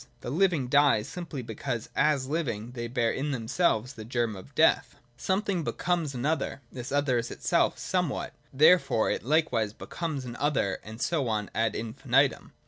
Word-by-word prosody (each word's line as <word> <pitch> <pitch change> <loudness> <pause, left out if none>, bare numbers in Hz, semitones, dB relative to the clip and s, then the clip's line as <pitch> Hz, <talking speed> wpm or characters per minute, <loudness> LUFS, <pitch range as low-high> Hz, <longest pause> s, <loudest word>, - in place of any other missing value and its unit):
The 120 - -5
living 165 -5 +2
die, 140 -5 +4
simply 155 -1 -6
because 115 +1 -4
as 150 -3 +2
living 125 -8 -2
they 120 -1 -5
bear 115 -1 +1
in 140 +3 -2
them 120 -5 -3
selves 125 -4 +1
the 110 - -9
germ 115 -1 -1
of 95 - -12
death. - - +3
93.] - - -26 0.2
Something 190 -2 0
becomes 165 -3 -1
an 125 +2 -3
other: 155 -2 -1
this 125 -1 -7
other 140 -3 +2
is 115 - -4
itself - - +1
somewhat: - - -2 0.2
therefore 150 -5 +4
it - - -1
likewise 125 -7 +1
becomes 150 0 -5
an 120 -1 -6
other, 140 -10 0
and 110 +1 -9
so 140 0 0
on 105 -2 -2
ad 115 0 0
infinitum. 130 +4 +1
130 Hz, 175 wpm, -28 LUFS, 115-150 Hz, 0.2 s, die